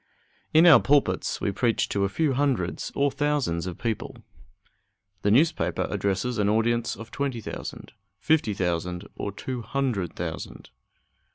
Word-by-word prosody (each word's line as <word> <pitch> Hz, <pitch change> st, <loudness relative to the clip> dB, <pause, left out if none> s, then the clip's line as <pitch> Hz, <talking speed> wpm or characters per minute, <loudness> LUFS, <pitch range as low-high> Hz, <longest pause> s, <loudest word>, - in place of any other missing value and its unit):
In 160 Hz, +2 st, +6 dB
our 160 Hz, -8 st, +9 dB
pulpits 145 Hz, +2 st, +1 dB
we 100 Hz, -, 0 dB
preach 115 Hz, +3 st, +1 dB
to 100 Hz, -, 0 dB
a -, -, -1 dB
few 150 Hz, +6 st, +1 dB
hundreds 130 Hz, -10 st, -1 dB
or 140 Hz, 0 st, +2 dB
thousands 140 Hz, -, 0 dB
of 90 Hz, -, -5 dB
people; 115 Hz, -3 st, -3 dB, 1.1 s
the 105 Hz, -, +1 dB
newspaper 155 Hz, +10 st, +2 dB
addresses 100 Hz, +4 st, -1 dB
an 100 Hz, -1 st, +2 dB
audience 115 Hz, +2 st, +1 dB
of 115 Hz, 0 st, -10 dB
twenty 140 Hz, -4 st, -2 dB
thousand, 110 Hz, -, -7 dB, 0.3 s
fifty 145 Hz, -6 st, +1 dB
thousand, 90 Hz, 0 st, -2 dB
or 100 Hz, -, -4 dB
two 125 Hz, +4 st, -5 dB
hundred 120 Hz, -8 st, -2 dB
thousand. -, -, -6 dB
115 Hz, 145 wpm, -26 LUFS, 100-140 Hz, 1.1 s, our